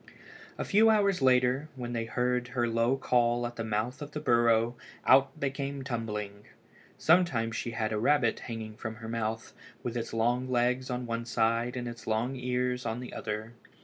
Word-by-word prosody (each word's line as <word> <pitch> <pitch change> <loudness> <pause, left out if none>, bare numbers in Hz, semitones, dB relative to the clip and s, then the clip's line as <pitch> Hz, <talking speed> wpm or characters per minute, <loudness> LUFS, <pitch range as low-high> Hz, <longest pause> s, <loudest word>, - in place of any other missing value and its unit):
A - - -3
few 220 +3 +5
hours 200 -6 +3
later, 130 +3 +3
when 120 -2 -5
they 115 -1 -1
heard 125 +1 0
her 120 -2 0
low 115 +3 +2
call 120 -2 +2
at 120 0 -5
the 115 - -3
mouth 110 +4 -2
of 145 0 -7
the 150 - -3
burrow, 120 -3 +3 0.3
out 135 +3 +5
they 140 -2 0
came 140 0 -4
tumbling. 105 -5 -4 0.5
Sometimes 150 -10 +3
she 120 - -3
had 110 -1 -1
a 105 - 0
rabbit 120 -1 +2
hanging 110 -2 -6
in 110 -1 -3
her 115 0 -9
mouth, 115 0 -3 0.3
with 120 -1 -3
its 115 -1 -3
long 120 +3 0
legs 125 +1 +1
on 125 0 -2
one 115 0 -3
side 115 +1 +1
and 120 -1 -3
its 120 -1 -8
long 115 +4 0
ears 125 0 -1
on 115 0 -3
the 125 - -8
other. 110 +1 -4
120 Hz, 185 wpm, -30 LUFS, 115-130 Hz, 0.5 s, few